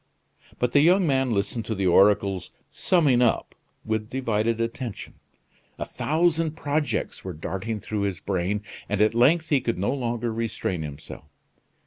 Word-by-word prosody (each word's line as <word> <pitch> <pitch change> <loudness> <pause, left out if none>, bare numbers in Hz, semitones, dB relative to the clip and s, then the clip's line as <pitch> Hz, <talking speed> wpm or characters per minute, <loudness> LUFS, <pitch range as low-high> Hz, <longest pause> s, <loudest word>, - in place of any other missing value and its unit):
But 125 -1 0
the 145 - +5
young 180 +5 +5
man 135 -3 +2
listened 110 +1 -1
to 110 - -2
the 95 -1 -1
oracle's 100 +1 +3 0.2
"summing 145 -9 +3
up" 120 - +1 0.3
with 110 0 -2
divided 115 -3 0
attention. 115 -1 -4 0.6
A - - -3
thousand 160 0 0
projects 145 0 -2
were 95 - -5
darting 95 +7 -4
through 105 +1 -3
his 100 -3 -2
brain, 100 +2 -2 0.3
and 105 - -1
at 110 +1 +4
length 155 +8 +3
he 140 -3 +3
could 90 - -1
no 100 +7 0
longer 120 -3 -2
restrain 110 -6 -2
himself. 75 0 -8
115 Hz, 150 wpm, -25 LUFS, 100-135 Hz, 0.6 s, the